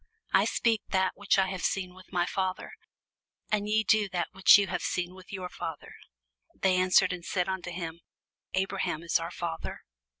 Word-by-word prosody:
I - - +5
speak 225 -2 +1
that 190 -1 +1
which 205 -1 +1
I 190 - +4
have 185 -1 -4
seen 185 -2 -1
with 185 0 -16
my 175 -2 +1
Father: 185 0 -2 0.8
and 210 -1 0
ye 220 +1 +3
do 215 -2 +3
that 175 -2 -2
which 195 +1 +7
ye 200 - +2
have 180 -1 -3
seen 180 0 -2
with 185 -1 -14
your 185 -2 -4
father. - - -7 0.6
They 190 -1 +2
answered 185 0 +4
and 175 -1 -7
said 180 0 -1
unto 190 -1 -3
him, 170 -1 -6 0.5
Abraham 190 -4 -1
is 170 - +2
our 165 0 -4
father. 170 -2 -5
185 Hz, 180 wpm, -29 LUFS, 175-195 Hz, 0.8 s, which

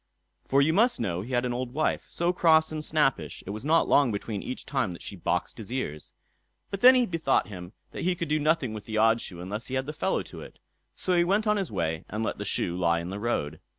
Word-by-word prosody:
For 140 +1 +4
you 160 +3 +2
must 230 +7 +3
know 90 -6 -1
he 120 +6 -7
had 120 0 +1
an 125 - -1
old 125 0 -4
wife, 155 - 0
so 170 +1 0
cross 160 -3 +4
and 155 -1 -3
snappish, 140 - 0
it 100 - -5
was 110 +3 -6
not 160 +3 +3
long 140 -4 +4
between 100 0 -4
each 130 - -6
time 125 -9 -1
that 85 - -11
she - - -6
boxed 90 - -2
his 110 +1 -8
ears. 75 - -4 0.6
But 195 - -4
then 255 +1 +9
he 250 -1 +4
bethought 160 - 0
him 90 -1 -9 0.2
that - - -6
he 180 +1 +1
could 170 - -3
do 155 +1 +1
nothing 150 -6 +1
with 105 -1 -7
the 110 0 -3
odd 115 +1 +4
shoe 85 - -8
unless 105 +6 -5
he 130 - -4
had 130 0 -1
the 150 - -5
fellow 190 +5 -1
to - - -10
it; - - -12 0.4
so 185 - -1
he 175 - +4
went 200 +5 +1
on 210 0 +2
his 195 - -2
way 80 -5 -2
and 110 +2 -3
let - - -3
the - - -4
shoe 85 - -1
lie 85 -2 +2
on 85 +2 -5
the 100 - -5
road. 80 -9 -2
125 Hz, 260 wpm, -27 LUFS, 100-160 Hz, 0.6 s, then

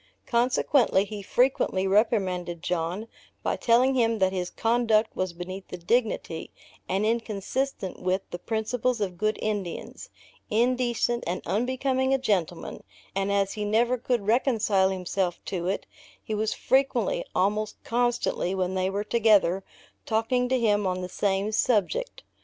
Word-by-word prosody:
Consequently, 240 -3 +2
he 210 0 -7
frequently 220 -3 +1
reprimanded 185 -4 +1
John, 180 +5 -2 0.4
by - - 0
telling 250 +3 +3
him 230 -3 +2
that 190 -2 +2
his 180 -1 -2
conduct 225 -1 +1
was 185 -1 -1
beneath 185 +3 -7
the 180 - -7
dignity, 190 -4 -1 0.4
and 195 +3 +1
inconsistent 225 0 -2
with 185 +1 0
the 175 - -5
principles 230 +2 -1
of 190 -4 -2
good 215 +3 0
Indians; 205 -5 -4 0.4
indecent 240 +1 +1
and 175 +2 -2
unbecoming 260 +4 +1
a - - +2
gentleman; 190 -10 -2 0.3
and, 195 +1 0
as 200 -1 +1
he 210 - -4
never 230 +4 +2
could 245 -3 -1
reconcile 220 -4 +2
himself 185 -1 -2
to 180 -2 -3
it, 195 - -1 0.4
he 220 - -4
was 215 +1 0
frequently, 275 - +1
almost 210 +3 +1
constantly, 240 -6 0
when 185 -1 -1
they 185 0 0
were 200 +1 -2
together, 210 -5 +3 0.4
talking 245 +3 +1
to 260 0 +2
him 205 -3 +2
on 185 0 -1
the 180 - -5
same 200 +2 0
subject. 245 - 0
210 Hz, 140 wpm, -26 LUFS, 190-240 Hz, 0.4 s, telling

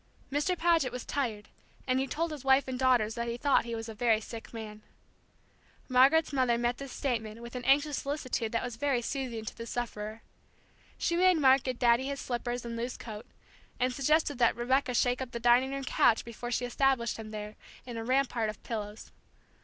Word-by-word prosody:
Mr. 295 +6 0
Paget 330 -7 +2
was 250 0 -6
tired, 225 -7 -2 0.4
and 255 0 +1
he 270 - -1
told 325 +4 -2
his 295 -4 -7
wife 270 +1 +4
and 255 -1 -4
daughters 245 -4 +3
that 235 +1 -3
he 235 0 -3
thought 280 0 +3
he 235 -1 -4
was 225 0 -5
a 225 - -6
very 225 0 +2
sick 225 +1 -9
man. 215 -2 -8 1.1
Margaret's 275 +5 +4
mother 255 -3 +2
met 240 +1 -1
this 275 -1 -7
statement 225 -5 -3
with 235 +1 -9
an 250 - -4
anxious 285 +2 +3
solicitude 255 -6 -2
that 230 - -1
was 245 -2 -5
very 265 -2 0
soothing 240 -4 -3
to - - -6
the 230 0 -7
sufferer. 220 -2 -5 0.7
She 340 - 0
made 365 0 +5
Mark 270 -2 +5
get 255 -1 -3
Daddy 240 +1 +3
his 280 0 -3
slippers 245 0 -3
and 235 0 -4
loose 240 +2 -4
coat, 220 +1 -8 0.5
and 255 0 +1
suggested 290 0 +1
that 235 - +4
Rebecca 250 +1 +1
shake 245 +1 +2
up 255 -2 -6
the 235 - -3
dining 240 +3 +4
room 275 0 -4
couch 235 -3 +3
before 235 +1 -6
she 245 0 -1
established 245 -1 +1
him 220 -1 -8
there, 210 0 -6 0.3
in 245 -2 -7
a 225 - -4
rampart 250 -3 +1
of 215 - -8
pillows. 210 -1 -6
245 Hz, 200 wpm, -30 LUFS, 230-270 Hz, 1.1 s, made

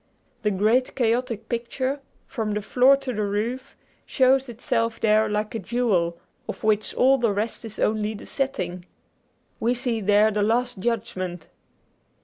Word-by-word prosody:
The 210 - +1
great 215 +6 +2
chaotic 235 -2 0
picture, 255 +4 -2 0.3
from 220 -4 -3
the 210 - -2
floor 260 +5 +5
to 270 -2 -5
the 215 - -2
roof, 220 +6 -3 0.3
shows 265 0 +3
itself 230 -1 -1
there 215 0 +3
like 210 0 -2
a 225 - -2
jewel, 190 -6 0 0.3
of - - -6
which 215 -1 +1
all 265 +1 +4
the 230 -3 +2
rest 210 +4 -2
is 215 -1 -5
only 215 0 0
the - - -10
setting. 180 -10 -3 0.7
We 240 +2 +1
see 240 -3 -2
there 210 +2 +4
the 210 0 0
Last 235 +1 +1
Judgment. 185 -6 -3
225 Hz, 150 wpm, -24 LUFS, 210-250 Hz, 0.7 s, floor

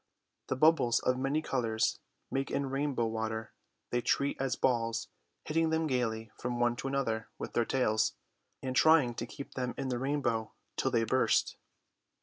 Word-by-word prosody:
The - - 0
bubbles 140 -4 +4
of 125 0 +1
many 140 +4 0
colours 115 -6 0 0.3
made 135 0 -1
in 140 -1 -1
rainbow 135 -3 0
water 110 0 -3 0.4
they 120 - +1
treat 140 +4 +1
as 135 -1 0
balls, 115 -3 0 0.4
hitting 165 +1 +1
them 160 0 +1
gaily 115 -5 -1
from 120 0 -2
one 120 0 +3
to 135 - -4
another 115 -5 -1
with - - -6
their 120 - +2
tails, 110 -4 +1 0.5
and 130 -1 -2
trying 155 -6 +5
to 120 0 -5
keep 140 - -9
them 125 -1 -3
in 135 -1 -2
the 125 -1 -1
rainbow 130 -5 -1 0.2
till 130 - +1
they 115 -3 +2
burst. 130 +4 +2
125 Hz, 165 wpm, -31 LUFS, 115-140 Hz, 0.5 s, trying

